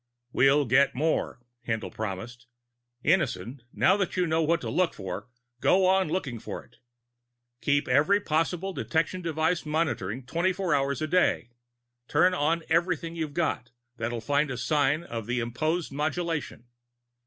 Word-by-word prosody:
"We'll 140 +2 +4
get 135 +3 +3
more," 150 -3 -1 0.2
Haendl 115 -1 -2
promised. 110 +4 -6 0.6
"Innison, 135 - +1
now 190 - +3
that 195 -2 -2
you 180 - +3
know 160 0 +1
what 165 +2 +2
to - - -4
look 180 -2 +1
for, 95 +3 -6 0.3
go 185 +8 +4
on 190 0 +3
looking 140 -9 -2
for - - -6
it. - - -26 0.8
Keep 145 +1 +1
every 190 +8 +4
possible 175 +2 -1
detection 165 +2 -1
device 165 +1 0
monitored 130 - -2
twenty 175 +5 +1
four 185 -3 -1
hours 140 +1 0
a - - 0
day. 160 -8 +2 0.6
Turn 185 +1 +4
on 165 0 +1
everything 170 0 0
you've 155 -3 -4
got 155 -8 -1 0.3
that'll 120 0 -3
find 145 +5 +1
a 130 - -4
sign 145 +5 +1
of 115 -8 -6
imposed 125 +8 -1
modulation. 150 -3 -2
155 Hz, 145 wpm, -27 LUFS, 125-170 Hz, 0.8 s, We'll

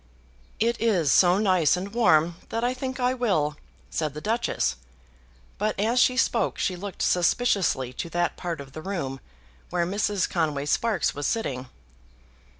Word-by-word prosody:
"It 235 +1 +1
is 185 -11 +2
so 180 0 +5
nice 185 -6 +3
and 195 +3 -6
warm, 170 -8 +3
that 230 +1 -2
I 245 +1 +1
think 260 0 -5
I 250 0 +2
will," 190 - 0 0.4
said 155 -3 -2
the - - -4
Duchess; 220 - -1 0.8
but 210 0 -1
as 230 +4 +2
she 255 0 +4
spoke 235 -4 +1
she 185 - 0
looked 195 +2 -5
suspiciously 180 - +1
to 170 - -5
that 175 0 0
part 170 -3 -4
of 140 -1 -9
the 155 - -8
room 155 -8 -4 0.5
where 175 -1 0
Mrs. 200 0 0
Conway 145 -3 -1
Sparkes 210 +2 +1
was 145 0 -2
sitting. 135 - -2
185 Hz, 155 wpm, -26 LUFS, 155-225 Hz, 0.8 s, so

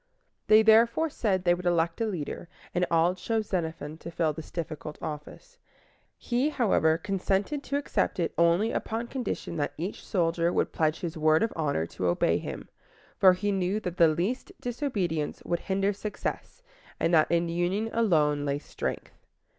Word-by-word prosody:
They 215 0 +7
therefore 230 +8 +4
said 190 -8 0
they 175 -1 +4
would 180 0 -3
elect 170 +2 +1
a 225 - +1
leader, 175 -3 -5 0.2
and 180 0 +1
all 170 +1 +3
chose 220 +4 -2
Xenophon 160 -4 -3
to - - -8
fill 165 -2 0
this 155 +1 -9
difficult 155 -3 -5
office. 160 - -8 0.6
He, 250 +4 0
however, 195 - +2
consented 195 - -1
to 280 - -1
accept 285 -8 -1
it 170 - 0
only 170 +7 +3
upon 225 +2 -2
condition 245 -9 -4
that 145 - -1
each 180 +6 -5
soldier 170 -2 +1
would - - 0
pledge 155 0 0
his 165 -2 -4
word 155 +3 +4
of 225 - -1
honor 145 - 0
to 90 +2 -3
obey 85 - +2
him; - - -7 0.5
for 185 -1 +7
he 205 +3 -1
knew 190 +1 0
that 180 -2 -5
the 165 - +7
least 185 - -1
disobedience 205 - -2
would 170 - 0
hinder 195 +1 0
success, 210 - -5 0.4
and 165 - +1
that 155 -2 +5
in 170 0 +2
union 180 +6 -1
alone 155 -10 +2
lay 140 -1 0
strength. - - -6
175 Hz, 170 wpm, -28 LUFS, 160-215 Hz, 0.6 s, They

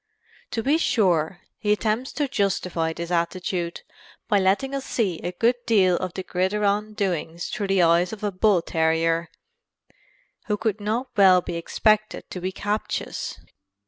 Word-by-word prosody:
To 225 - -3
be 295 +6 +3
sure, 180 - +1 0.2
he 210 - 0
attempts 220 +5 0
to 295 -2 0
justify 185 -8 0
this 170 +1 -6
attitude 175 0 -1 0.5
by 205 -3 +3
letting 200 +9 +1
us 275 -1 -2
see 200 -11 -1
a 175 - -4
good 230 +7 +2
deal 190 -6 +4
of 185 -2 -4
the 190 - -4
gridiron 205 +3 0
doings 175 -5 -2
through 205 - -3
the 195 -2 +3
eyes 170 +2 +3
of 215 -1 -8
a 205 - 0
bull 185 -2 +3
terrier 165 0 +1 1.2
who 210 - 0
could 215 -1 -1
not 230 +5 -1
well 190 -3 +7
be 175 - -5
expected 215 +5 +1
to 180 - -5
be 185 +1 -2
captious. 210 +2 -3
195 Hz, 155 wpm, -24 LUFS, 175-215 Hz, 1.2 s, well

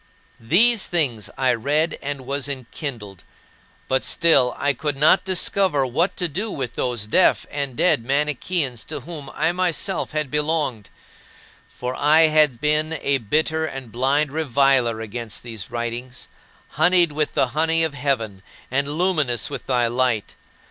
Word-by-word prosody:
These 200 - +3
things 135 -11 -1
I 130 -2 +2
read 145 +7 0
and 140 -1 -4
was 140 +1 -1
enkindled 115 - -6 0.6
but 130 0 0
still 140 -7 +3
I 145 0 +1
could 145 +1 -3
not 155 +6 +4
discover 185 -5 +1
what 155 +9 0
to 175 - 0
do 195 +9 -4
with 130 - -4
those 120 -4 -2
deaf 175 +12 +3
and 140 -3 -3
dead 115 - +2
Manicheans 140 0 -1
to - - -5
whom 155 -5 -9
I 160 +2 +1
myself 180 0 -1
had 150 -3 -3
belonged; 150 -7 -1 0.8
for 125 +1 -5
I 155 +4 +4
had 150 -6 +3
been 150 +1 +1
a 140 -3 0
bitter 155 +7 0
and 135 -5 -8
blind 135 +5 +1
reviler 135 -6 +2
against 110 0 -6
these 110 -6 -7
writings, 120 +2 -5 0.4
honeyed 175 +2 +3
with 150 0 -2
the 130 - +2
honey 165 +4 +1
of 160 -3 -1
heaven 125 -9 -2 0.3
and 140 +2 0
luminous 155 - 0
with - - -7
thy 125 -2 +2
light. 120 -2 -1
140 Hz, 150 wpm, -22 LUFS, 125-160 Hz, 0.8 s, not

